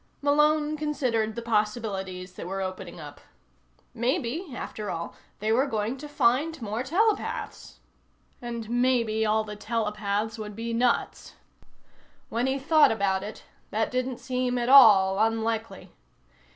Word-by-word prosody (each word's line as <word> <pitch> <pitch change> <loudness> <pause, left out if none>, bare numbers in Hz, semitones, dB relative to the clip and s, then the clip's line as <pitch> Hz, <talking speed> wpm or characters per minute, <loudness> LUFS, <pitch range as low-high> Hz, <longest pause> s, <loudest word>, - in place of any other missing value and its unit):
Malone 300 +1 +2
considered 250 -8 -1
the 235 - -5
possibilities 210 -5 -2
that 175 - -8
were 195 +1 -4
opening 185 -1 -6
up. - - -10 0.7
Maybe, 250 +7 -1
after 210 -4 -6
all, 170 0 -4 0.2
they 215 +2 -1
were 260 +5 +3
going 220 0 -2
to 295 +3 -8
find 290 +4 +1
more 220 0 -3
telepaths. 395 - -1 0.6
And 235 -2 -5
maybe 235 -2 +1
all 215 +1 +2
the 210 -1 -7
telepaths 210 0 -2
would 210 -1 -6
be 230 +1 -4
nuts. 240 +1 0 0.9
When 235 +3 0
he 265 +1 0
thought 305 +3 +4
about 195 -3 0
it, 210 +2 -8 0.3
that 220 +1 -1
didn't 255 0 -2
seem 250 0 -2
at 240 0 -1
all 205 -8 +7
unlikely. 225 0 -1
230 Hz, 135 wpm, -26 LUFS, 210-255 Hz, 0.9 s, all